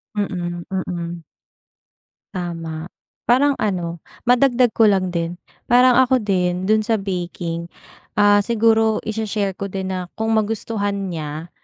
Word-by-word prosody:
Mm 175 -4 -3
mm. 175 -3 -4 1.1
Tama. 165 -2 -5 0.4
Parang 275 +3 +3
ano, 175 -5 -2 0.2
madagdag 245 0 +4
ko 225 - +4
lang 190 -3 +3
din. 170 0 -3 0.3
Parang 250 0 +5
ako 260 -1 +4
din 180 -2 0
dun 215 0 +3
sa 225 -1 +2
baking. 175 -3 -4 0.5
Ah, 205 0 +6
siguro 225 -1 +3
i-she-share 210 -2 -2
ko 200 - -3
din 190 -1 -4
na 180 -1 -4
kung 220 0 0
magustuhan 205 -2 -1
niya, 155 0 -5
195 Hz, 125 wpm, -21 LUFS, 175-220 Hz, 1.1 s, Ah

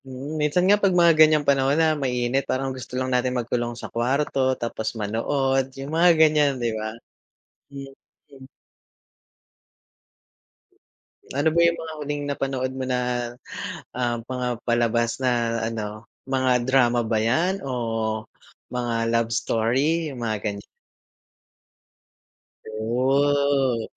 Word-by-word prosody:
Mm, 135 +3 -7
minsan 150 +4 +2
nga 205 +2 +4
'pag 190 -3 +3
mga 170 -1 +6
ganyang 155 -1 +6
panahon 135 +1 +2
na 160 -1 +3
mainit 130 -2 0
parang 135 0 -1
gusto 130 -1 -10
lang 130 0 -1
natin 125 0 +1
magkulong 120 0 -2
sa - - -8
kwarto, 130 +2 0
tapos 115 -1 -4
manood 135 +5 0
yung 135 +3 -6
mga 175 +1 +6
ganyan, 150 -2 +5
di 120 -2 -1
ba? 110 0 -3 0.8
Hmm, 140 0 -8 0.4
hmm. 135 -2 -14 2.9
Ano 145 +4 +1
ba 170 - +2
yung 170 0 +3
mga 160 -1 -7
huling 145 0 -3
napanood 135 -2 -2
mo 130 0 -4
na, 125 -1 +1 0.9
ah, 120 -1 -1
mga 125 -1 -3 0.2
palabas 120 0 +1
na 120 -2 0
ano, 110 -1 -6 0.2
mga 130 -2 +1
drama 120 -2 +3
ba 110 -1 0
yan 170 - +1
o 115 -5 -2 0.5
mga 120 -1 -1 0.2
love 115 -1 +1
story? 135 +11 +1
Yung 125 -4 -6
mga 110 -1 -1
ganyan. 100 -1 -4 2.0
Oh. 135 +2 +1
130 Hz, 125 wpm, -24 LUFS, 120-145 Hz, 2.9 s, mga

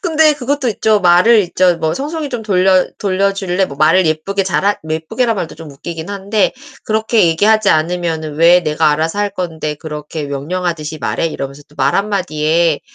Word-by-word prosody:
근데 320 -4 +3
그것도 280 -1 -2
있죠. 215 -1 +1
말을 185 +6 +5
있죠. 180 -1 +1
뭐 160 0 -1
"청소기 300 +2 -4
좀 245 -4 -5
돌려 185 -2 +3
돌려줄래?" 195 -1 0
뭐 140 - -10
말을 160 +4 +3
예쁘게 195 +6 -1
잘하 195 +2 0
예쁘게란 220 +10 -1
말도 175 -4 -4
좀 160 -2 -11
웃기긴 160 +4 -7
한데 200 +1 0 0.3
그렇게 220 -2 +2
얘기하지 205 +5 +3
않으면은 160 -1 -1
"왜 170 +3 +5
내가 155 -1 +1
알아서 160 +5 -1
할 205 0 0
건데 160 -5 -4
그렇게 150 0 -6
명령하듯이 155 +2 -4
말해?" 165 - -1
이러면서 140 -2 -6
또 150 - -23
말 130 - +2
한마디에 170 -5 0
180 Hz, 380 characters per minute, -15 LUFS, 155-205 Hz, 0.3 s, 말을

